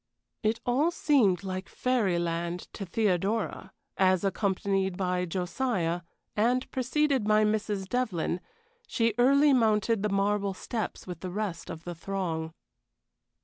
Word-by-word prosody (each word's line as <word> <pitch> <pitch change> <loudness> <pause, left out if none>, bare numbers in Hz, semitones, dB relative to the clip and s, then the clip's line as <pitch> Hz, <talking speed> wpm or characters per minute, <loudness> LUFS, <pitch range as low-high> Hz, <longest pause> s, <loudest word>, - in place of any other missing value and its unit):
It 220 +1 +1
all 270 +7 +3
seemed 250 - +3
like 185 0 -4
fairy 230 -9 +1
land 170 +1 -2
to 195 - -6
Theodora 195 0 0 0.3
as, 185 -1 +3
accompanied 195 -1 0
by 180 -1 0
Josiah, 180 -1 -1 0.3
and 245 +4 +2
preceded 265 -2 +1
by 215 0 +4
Mrs. 210 -2 -1
Devlyn, 195 -8 -1 0.5
she 230 -2 +1
early 280 +3 +5
mounted 225 -2 +3
the 210 - 0
marble 200 0 +1
steps 220 +1 -4
with 180 -3 -7
the 185 - -5
rest 190 -3 -4
of 160 - -7
the 175 - -5
throng. 165 -2 -3
200 Hz, 130 wpm, -28 LUFS, 180-230 Hz, 0.5 s, early